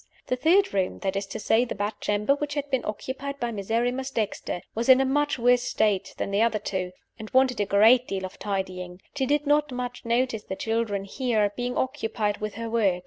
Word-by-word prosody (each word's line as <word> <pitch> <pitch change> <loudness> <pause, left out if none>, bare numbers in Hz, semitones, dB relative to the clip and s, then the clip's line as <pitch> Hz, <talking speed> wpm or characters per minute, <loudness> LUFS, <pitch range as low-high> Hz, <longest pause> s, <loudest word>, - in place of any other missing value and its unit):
The 255 - 0
third 345 +10 +3
room 190 -2 0
(that 195 -1 -1
is 195 0 -2
to - - -6
say, 225 +2 +3
the 250 - -4
bedchamber 210 +3 0
which 290 +1 -3
had 290 -1 -2
been 260 -2 +1
occupied 265 +6 -5
by 240 -1 -1
Miserrimus 235 +5 -1
Dexter) 215 -7 -3
was 235 +3 -2
in 260 0 +8
a 270 - +3
much 290 +2 +1
worse 245 0 +4
state 200 -5 0
than - - -3
the 200 +2 +2
other 225 -2 +3
two, 190 -3 -3 0.3
and 220 -1 -7
wanted 260 -2 +3
a 205 - +1
great 225 +5 +5
deal 190 -1 -3
of 185 - -10
tidying. 185 -3 -4 0.2
She 265 -2 0
did 295 +2 +1
not 295 0 +2
much 250 0 -5
notice 235 -2 0
the 190 - -4
children 220 -2 -1
here, 215 -1 0
being 245 0 -3
occupied 225 -6 -1
with 215 -1 -4
her 230 +1 -4
work. 210 -6 +2
230 Hz, 210 wpm, -26 LUFS, 205-260 Hz, 0.3 s, in